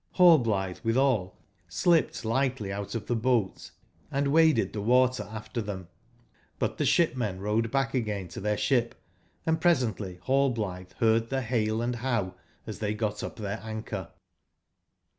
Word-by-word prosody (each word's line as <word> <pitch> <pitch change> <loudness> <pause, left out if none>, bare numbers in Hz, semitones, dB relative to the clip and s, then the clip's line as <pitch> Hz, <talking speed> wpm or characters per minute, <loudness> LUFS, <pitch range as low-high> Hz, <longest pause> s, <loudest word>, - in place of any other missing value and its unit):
Hallblithe 115 - +4
withal 115 -5 +1 0.3
slipped 160 - +1
lightly 120 -4 0
out 100 +3 -5
of 110 -2 -3
the 120 - -1
boat 115 -4 0 0.4
and 140 0 0
waded 160 -5 +4
the 105 - -3
water 125 +2 +3
after 110 +2 -5
them. 95 -4 -6 0.7
But - - -2
the - - +2
shipmen 120 - +1
rowed 105 +3 0
back 135 -1 0
again 105 -7 -2
to 115 - -8
their 105 +1 0
ship, 120 -2 +1 0.3
& - - -39
pre 160 - +2
sently 115 - 0
Hallblithe 110 -8 0
heard 115 0 +2
the 135 -1 -1
hale 110 -2 0
and 120 0 -1
how, 115 -7 -1 0.3
as - - -7
they 105 -1 -1
got 105 -1 -2
up - - -5
their 105 -1 -4
anchor. 110 0 -5
115 Hz, 150 wpm, -28 LUFS, 105-130 Hz, 0.7 s, Hallblithe